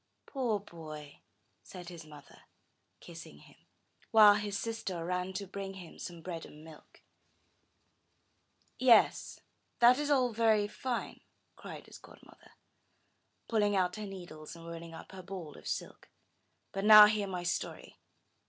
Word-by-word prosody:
'Toor 245 Hz, -7 st, -1 dB
boy!" 155 Hz, -6 st, -11 dB, 0.4 s
said 180 Hz, -2 st, -10 dB
his 170 Hz, -3 st, -10 dB
mother, 145 Hz, -2 st, -15 dB, 0.5 s
kissing 165 Hz, -, -11 dB
him, -, -, -18 dB, 0.5 s
while 215 Hz, -2 st, +8 dB
his 205 Hz, -1 st, -2 dB
sister 200 Hz, -7 st, -4 dB
ran 180 Hz, +1 st, -2 dB
to 195 Hz, +1 st, -5 dB
bring 195 Hz, 0 st, -7 dB
him 180 Hz, -3 st, -12 dB
some 170 Hz, -2 st, -8 dB
bread 170 Hz, -3 st, -6 dB
and 150 Hz, +1 st, -13 dB
milk. 160 Hz, -1 st, -16 dB, 1.8 s
*'Yes, 240 Hz, -4 st, +4 dB, 0.4 s
that 245 Hz, +3 st, +6 dB
is 295 Hz, 0 st, -2 dB
all 255 Hz, -4 st, +2 dB
very 215 Hz, -2 st, +3 dB
fine," 245 Hz, +2 st, -4 dB, 0.3 s
cried -, -, -10 dB
his -, -, -13 dB
godmother, -, -, -18 dB, 0.9 s
pulling 210 Hz, -3 st, +1 dB
out 180 Hz, 0 st, +1 dB
her 210 Hz, -1 st, -5 dB
needles, 175 Hz, -6 st, -9 dB
and 165 Hz, 0 st, -12 dB
rolling 170 Hz, 0 st, -8 dB
up -, -, -11 dB
her 190 Hz, -1 st, -9 dB
ball 180 Hz, -5 st, -8 dB
of -, -, -12 dB
silk; -, -, -5 dB, 0.6 s
but 195 Hz, -, -4 dB
now 210 Hz, 0 st, +11 dB
hear 210 Hz, -1 st, 0 dB
my 180 Hz, -2 st, -4 dB
story! 175 Hz, -, -4 dB
190 Hz, 140 wpm, -32 LUFS, 170-215 Hz, 1.8 s, now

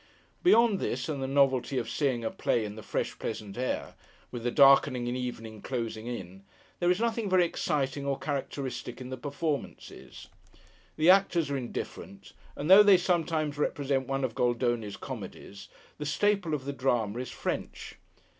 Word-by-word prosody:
Beyond 230 Hz, -, +5 dB
this, -, -, -2 dB
and 145 Hz, -4 st, -3 dB
the 135 Hz, -, -2 dB
novelty 135 Hz, -1 st, +2 dB
of 120 Hz, -2 st, -1 dB
seeing 125 Hz, -2 st, -1 dB
a -, -, -1 dB
play 115 Hz, -, 0 dB
in 105 Hz, 0 st, -6 dB
the 110 Hz, -, -8 dB
fresh -, -, -3 dB
pleasant 105 Hz, -3 st, -5 dB
air, 125 Hz, +1 st, -3 dB, 0.4 s
with 120 Hz, -, -5 dB
the 120 Hz, -, +1 dB
darkening 135 Hz, -2 st, +5 dB
evening 120 Hz, -3 st, -5 dB
closing 115 Hz, -3 st, -4 dB
in, 95 Hz, -5 st, -7 dB, 0.4 s
there 175 Hz, -, +2 dB
is 180 Hz, +2 st, +2 dB
nothing 230 Hz, -2 st, -1 dB
very 185 Hz, -1 st, +4 dB
exciting 145 Hz, -5 st, -1 dB
or 140 Hz, -1 st, -1 dB
characteristic 135 Hz, -3 st, -4 dB
in 130 Hz, 0 st, -8 dB
the -, -, -2 dB
performances. 145 Hz, +3 st, -5 dB, 0.7 s
The 160 Hz, +3 st, +6 dB
actors 175 Hz, -6 st, +3 dB
are 140 Hz, -, 0 dB
indifferent; 100 Hz, -5 st, -7 dB, 0.2 s
and 145 Hz, -, -4 dB
though 190 Hz, +3 st, +10 dB
they 205 Hz, -2 st, +7 dB
sometimes 165 Hz, -4 st, 0 dB
represent 135 Hz, -3 st, 0 dB
one 135 Hz, 0 st, -1 dB
of 125 Hz, -3 st, -1 dB
Goldoni's 120 Hz, -4 st, 0 dB
comedies, 100 Hz, 0 st, -8 dB, 0.3 s
the 150 Hz, -, -3 dB
staple 190 Hz, 0 st, +1 dB
of 135 Hz, -3 st, -6 dB
the 140 Hz, -, -3 dB
Drama 120 Hz, -5 st, 0 dB
is 125 Hz, -, -5 dB
French. -, -, -5 dB
135 Hz, 165 wpm, -29 LUFS, 120-155 Hz, 0.7 s, though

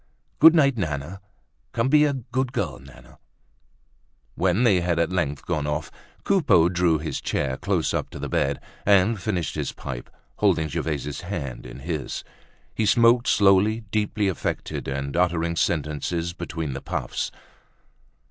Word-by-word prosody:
"Good 160 Hz, +2 st, +9 dB
night, 140 Hz, -5 st, +4 dB
Nana. 80 Hz, +3 st, -3 dB, 0.5 s
Come 115 Hz, +3 st, +1 dB
be 150 Hz, +1 st, +6 dB
a 145 Hz, -, +1 dB
good 130 Hz, +1 st, -3 dB
girl, 80 Hz, -, -2 dB
Nana." 65 Hz, -2 st, -16 dB, 1.1 s
When 95 Hz, +6 st, +1 dB
they 100 Hz, -7 st, +4 dB
had 85 Hz, -1 st, 0 dB
at 85 Hz, +1 st, +1 dB
length 75 Hz, -6 st, -2 dB
gone 75 Hz, -5 st, -1 dB
off, 75 Hz, -1 st, -3 dB, 0.3 s
Coupeau 105 Hz, -, +4 dB
drew 90 Hz, -2 st, +2 dB
his 80 Hz, +1 st, -4 dB
chair 65 Hz, -2 st, -1 dB
close -, -, -1 dB
up -, -, -2 dB
to -, -, -9 dB
the -, -, -4 dB
bed 70 Hz, 0 st, 0 dB, 0.2 s
and 100 Hz, +1 st, +3 dB
finished 95 Hz, -6 st, -2 dB
his -, -, -3 dB
pipe, 65 Hz, -4 st, -7 dB, 0.3 s
holding 80 Hz, -1 st, +2 dB
Gervaise's 75 Hz, -1 st, -3 dB
hand 80 Hz, -9 st, -5 dB
in 65 Hz, -, -10 dB
his. 80 Hz, -2 st, -4 dB, 0.5 s
He 110 Hz, -, 0 dB
smoked 120 Hz, +2 st, +4 dB
slowly, 100 Hz, +3 st, +4 dB
deeply 105 Hz, -1 st, 0 dB
affected 95 Hz, -, -3 dB
and 70 Hz, +1 st, -3 dB
uttering 85 Hz, -1 st, +1 dB
sentences 80 Hz, +2 st, -1 dB
between 80 Hz, -4 st, -4 dB
the 70 Hz, -, -6 dB
puffs. -, -, -3 dB
85 Hz, 150 wpm, -24 LUFS, 75-105 Hz, 1.1 s, Good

